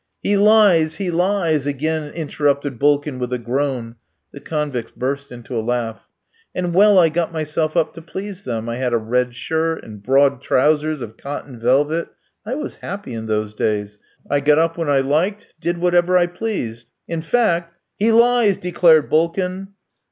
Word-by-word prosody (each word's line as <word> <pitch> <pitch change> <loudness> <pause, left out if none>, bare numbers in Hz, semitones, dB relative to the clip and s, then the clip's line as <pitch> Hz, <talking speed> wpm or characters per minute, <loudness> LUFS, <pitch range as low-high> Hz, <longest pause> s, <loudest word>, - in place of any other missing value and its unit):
"He 205 - +2
lies! 200 -6 +5
He 190 -3 -2
lies!" 170 -5 +1
again 150 +2 -2
interrupted 145 -4 -1
Bulkin, 145 -1 +1
with 125 0 -3
a - - 0
groan. 120 -1 -3 0.3
The 140 - -10
convicts 145 -7 -3
burst 140 +2 -4
into 120 0 -8
a 115 - 0
laugh. 115 -1 -3 0.5
"And 180 -1 -2
well 205 +2 +6
I 170 -3 +6
got 165 +1 -1
myself 155 0 -2
up 160 -2 +1
to 165 - -10
please 190 +3 -7
them. 115 - -4
I 115 0 -3
had 125 -1 -1
a - - +4
red 120 +2 -1
shirt, 160 +4 -2
and 105 -2 -11
broad 135 +3 +3
trousers 150 +1 +1
of 110 -1 -10
cotton 140 -3 -7
velvet. 145 +7 +1 0.4
I 250 - -2
was 300 +1 -6
happy 200 -9 -7
in 110 -1 -5
those 105 -1 -1
days. 105 -1 -2 0.3
I 145 - +1
got 145 +1 +3
up 165 +1 +2
when 165 -3 -2
I 140 -2 +3
liked; 165 +10 -1
did 175 +2 -1
whatever 175 +1 +3
I 175 - +4
pleased. 175 - -5 0.2
In 165 -1 -3
fact 170 -4 0
" - - -57
"He 220 +3 +3
lies," 235 -3 +4
declared 170 -4 +4
Bulkin. 180 +4 0
155 Hz, 175 wpm, -20 LUFS, 125-175 Hz, 0.5 s, well